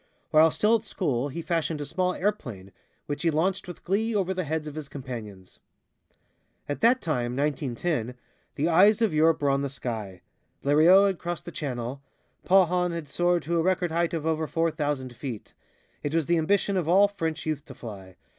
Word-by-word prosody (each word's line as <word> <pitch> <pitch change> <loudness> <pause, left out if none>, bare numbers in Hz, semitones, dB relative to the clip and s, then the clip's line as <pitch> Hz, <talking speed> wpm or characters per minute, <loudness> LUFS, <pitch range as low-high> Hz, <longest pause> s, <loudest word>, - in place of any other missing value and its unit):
While 155 +1 +6
still 215 +7 +3
at 215 - -12
school 145 - -1
he 165 +5 -6
fashioned 160 -2 -1
a 145 - -4
small 180 +4 -1
airplane, 120 - -3 0.3
which 145 - -4
he 170 - +2
launched 180 +5 0
with 175 - -9
glee 220 +5 0
over 190 -2 +1
the 185 -2 -3
heads 155 +1 -2
of 150 - -6
his 155 -2 -7
companions. 115 -9 -8 1.1
At 145 - -4
that 245 +3 +4
time 125 -7 -1
(1910), 140 -2 -1 0.4
the 150 - 0
eyes 200 +7 +5
of 215 - +2
Europe 155 0 +3
were 140 - +3
on 135 0 +1
the 140 - -2
sky. 110 -8 -6 0.4
Blériot 160 +8 +6
had 195 -3 0
crossed 175 0 -5
the 175 - -7
Channel; 130 -3 -4 0.4
Paulhan 180 -1 +3
had 165 -4 -5
soared 175 +2 +1
to 170 +1 0
a - - +3
record 180 -1 +1
height 170 +1 0
of 160 -2 -4
over 160 -1 0
four 165 +1 0
thousand 145 -5 -3
feet. 120 -3 -7 0.5
It 145 +2 -2
was 165 -2 +2
the 170 +2 +2
ambition 200 +4 +1
of 170 -3 -1
all 195 +3 +6
French 165 -6 -4
youth 155 -3 -2
to 130 - -11
fly. 95 -6 -10
160 Hz, 195 wpm, -26 LUFS, 140-180 Hz, 1.1 s, While